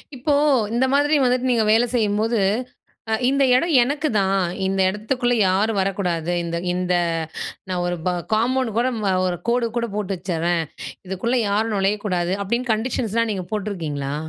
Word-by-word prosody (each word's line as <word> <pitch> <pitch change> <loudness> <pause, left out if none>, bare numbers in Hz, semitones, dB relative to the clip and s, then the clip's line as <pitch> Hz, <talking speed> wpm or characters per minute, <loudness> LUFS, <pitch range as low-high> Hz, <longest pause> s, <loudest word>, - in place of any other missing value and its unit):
இப்போ, 275 +4 0 0.4
இந்த 245 +3 +2
மாதிரி 290 +2 +3
வந்துட்டு 255 0 +1
நீங்க 230 -2 +2
வேல 230 +2 +4
செய்யும்போது 220 0 +1 0.7
அ - - 0 0.2
"இந்த 275 +1 +2
எடம் 335 +6 +1
எனக்குதான். 225 -9 +1 0.2
இந்த 190 0 0
எடத்துக்குள்ள 245 +5 -1
யாரும் 200 +3 +1
வரக்கூடாது. 180 -4 -1
இந்த 170 0 -3 0.2
இந்த 180 0 0 0.7
நான் 180 -1 -1
ஒரு 175 0 -1
ப - - +3 0.2
காம்பவுண்ட் 240 +1 0
கூட 245 +2 +2
ம் 210 - -2 0.2
ஒரு 175 -1 -2
கோடு 235 0 +2
கூட 235 0 0
போட்டு 200 -2 -2
வச்சிட்றேன். 175 -1 -1 0.4
இதுக்குள்ள 210 +7 -1
யாரும் 215 +2 0
நுழையக்கூடாது!" 195 -3 0
அப்டின்னு 235 +5 -1
கண்டிஷன்ஸ்லாம் 230 -1 -1
நீங்க 190 -3 -4
போட்ருக்கீங்களா? 160 -10 -3
210 Hz, 145 wpm, -22 LUFS, 185-240 Hz, 0.7 s, வேல